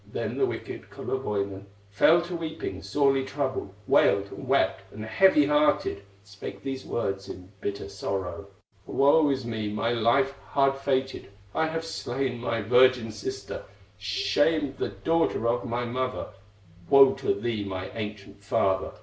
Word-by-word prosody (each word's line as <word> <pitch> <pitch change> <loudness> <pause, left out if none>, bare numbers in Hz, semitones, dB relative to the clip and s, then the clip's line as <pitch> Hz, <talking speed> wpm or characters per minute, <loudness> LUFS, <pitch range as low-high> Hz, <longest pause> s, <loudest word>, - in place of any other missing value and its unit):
Then - - -3
the 400 - +3
wicked - - -6
Kullerwoinen 100 -6 -3 0.2
Fell 165 +12 +5
to 175 +1 -5
weeping, 160 -1 -5
sorely 135 -2 +2
troubled, 130 -6 -3
Wailed, 100 +1 +3
and 135 - -8
wept, 95 -7 +1
and 110 +1 -7
heavy 150 +4 +5
hearted, 150 -8 +2 0.2
Spake 100 -1 -9
these 135 -1 -4
words 95 -4 -3
in 90 +1 -9
bitter 100 -1 -4
sorrow: 100 -1 -4 0.4
"Woe 145 +2 +4
is 135 -3 -1
me, 110 -3 -3
my 110 +3 0
life 120 +4 +2
hard 135 -1 +3
fated! 135 -3 -1 0.2
I 160 - +1
have 165 +1 -3
slain 130 -5 -3
my 115 -2 -2
virgin 125 +1 +4
sister, 400 +6 -6 0.3
Shamed 155 - +1
the - - -1
daughter 165 -8 0
of 120 +1 0
my 120 +1 -1
mother; 130 +1 -3 0.6
Woe 135 -1 +8
to - - -1
thee, 110 0 -2
my 95 -1 -5
ancient 105 -2 -7
father! 95 -1 +1
120 Hz, 145 wpm, -27 LUFS, 100-140 Hz, 0.6 s, Woe